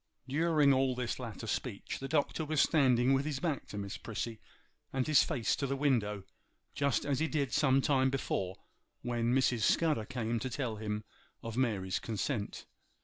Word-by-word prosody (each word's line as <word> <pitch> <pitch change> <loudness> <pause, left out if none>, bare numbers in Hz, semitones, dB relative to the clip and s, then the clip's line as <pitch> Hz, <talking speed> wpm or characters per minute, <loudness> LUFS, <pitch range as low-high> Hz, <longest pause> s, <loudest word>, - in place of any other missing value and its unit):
During 150 0 +3
all 130 -1 +2
this 125 0 -3
latter 115 -2 -6
speech 110 0 -3
the 135 - -4
Doctor 155 +2 0
was 155 -1 -1
standing 130 -5 +4
with 135 0 +2
his 145 -2 -3
back 155 -3 -2
to 105 - -7
Miss 100 0 -4
Prissy 115 0 -5 0.5
and 130 -1 0
his 155 -2 +6
face 115 - 0
to 140 - -1
the 135 - -1
window, 115 -8 +1 0.5
just 140 -2 +1
as 140 -2 0
he 160 - +1
did 145 -4 -1
some 135 -2 +4
time 130 -1 +3
before 95 -8 -2 0.5
when 120 -1 0
Mrs. 125 -2 +3
Scudder 150 -1 +2
came 120 -2 -2
to 130 - -3
tell 120 -3 -3
him 105 0 -3 0.4
of 115 -1 -5
Mary's 100 -8 0
consent. 110 0 -3
130 Hz, 175 wpm, -32 LUFS, 115-140 Hz, 0.5 s, his